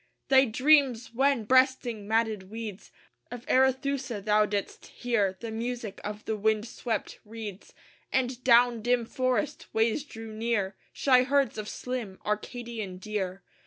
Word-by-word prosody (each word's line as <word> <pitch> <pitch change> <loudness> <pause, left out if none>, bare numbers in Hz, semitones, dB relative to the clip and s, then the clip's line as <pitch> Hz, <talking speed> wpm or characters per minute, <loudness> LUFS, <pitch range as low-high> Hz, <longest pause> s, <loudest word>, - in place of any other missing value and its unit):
Thy 265 0 +7
dreams! 255 -1 +3
when, 270 -1 +2
breasting 250 -3 +2
matted 220 -3 0
weeds 220 -2 -7 0.4
Of 245 -1 -8
Arethusa, 265 -2 +1
thou 210 +1 +3
didst 205 -1 -4
hear 210 -6 -1
The 230 -1 -6
music 230 -2 -4
of 210 +1 -6
the 220 - -1
wind 215 +1 +1
swept 230 0 -4
reeds; 215 -2 -9 0.4
And 255 -1 -1
down 240 -1 +5
dim 240 +1 +1
forest 255 -2 -1
ways 225 +5 +2
drew 225 -6 -9
near 215 -3 -1 0.2
Shy 255 -2 +4
herds 270 -3 +1
of 210 - -5
slim 240 -7 -5
Arcadian 215 -2 -4
deer. 190 -2 -4
230 Hz, 135 wpm, -28 LUFS, 210-255 Hz, 0.4 s, Thy